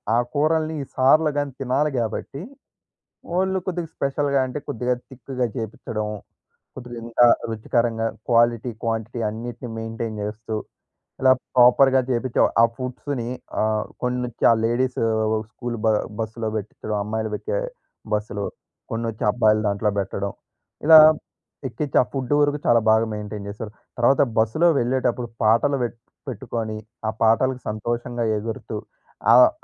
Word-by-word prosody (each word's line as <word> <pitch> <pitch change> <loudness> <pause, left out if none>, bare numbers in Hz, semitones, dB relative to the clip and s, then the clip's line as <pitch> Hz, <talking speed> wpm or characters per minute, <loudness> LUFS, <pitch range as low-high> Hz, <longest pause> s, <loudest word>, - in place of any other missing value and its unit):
ఆ - - +4 0.2
కూరల్ని 155 +1 +1 0.2
సార్‌‌‌‌‌‌‌‌‌లు 150 +4 +4
గాని 145 -1 -1
తినాలి 135 +3 +1
కాబట్టి, 120 +5 -4 1.0
ఓన్లీ 190 0 +1
కొద్దిగా 175 -3 -3
స్పెషల్‌గా 140 0 0
అంటే 130 +3 -4
కొద్దిగా 125 +2 -1 0.2
తిక్‌గా 130 -1 -3
జేపించడం. 110 -2 -4 0.7
కొద్దిగా 120 -2 -8
ఇంకా 120 +1 +4 0.2
రుచికరంగా 115 +1 0 0.2
క్వాలిటీ, 120 0 +3
క్వాంటిటీ 115 +1 -2
అన్నిటిని 120 +2 -6
మెయింటైన్ 115 -1 -4
జేస్తూ, 110 +2 -4 0.7
ఇలా 130 0 +6 0.2
ప్రాపర్‌గా 130 +2 +6
జేపించే, 125 0 -1 0.2
ఆ - - +7
ఫుడ్స్‌ని 130 -1 -4 0.3
ఆహ్, 110 0 +1 0.2
కొన్ని 125 0 0
వచ్చి 120 - -3
ఆ - - +6
లేడీస్ 125 +2 0 0.5
స్కూల్ 120 -1 -5
బ - - +4 0.3
బస్సులో 110 0 -3
పెట్టించడం, 105 +1 -5
అమ్మాయిలు 110 +1 -3
వచ్చే - - -2 0.5
బస్సులో, 105 -1 -2 0.5
కొన్ని 115 +1 -2
వచ్చి 110 - -7
అబ్బాయిలు 110 -2 +3
దాంట్లో 105 +1 0
బెట్టడం. 100 +1 -3 0.5
ఇలా 160 +1 +10 0.7
ఎక్కించి 140 +3 -2
ఆ - - +2
ఫుడ్ 130 -2 -3
వరకు 145 0 +2
చాలా 120 -1 +5
బాగా 110 +1 +4
మెయింటైన్ 105 -1 -6
చేశారు. 105 +1 -7 0.3
తర్వాత 120 +3 +4 0.2
బస్సులో 115 +10 +3
వెళ్ళేటప్పుడు, 125 0 0 0.2
పాటలు 115 +6 +3
పెటు 120 0 -3 0.3
పెట్టుకొని 115 -2 -4 0.3
ఆ - - +2
పాటలకి 125 +3 +3
సంతోషంగా 120 +3 -3
ఎగురుతూ 110 +1 -5 0.6
ఆహ్, - - +8
120 Hz, 130 wpm, -23 LUFS, 110-130 Hz, 1.0 s, ఇలా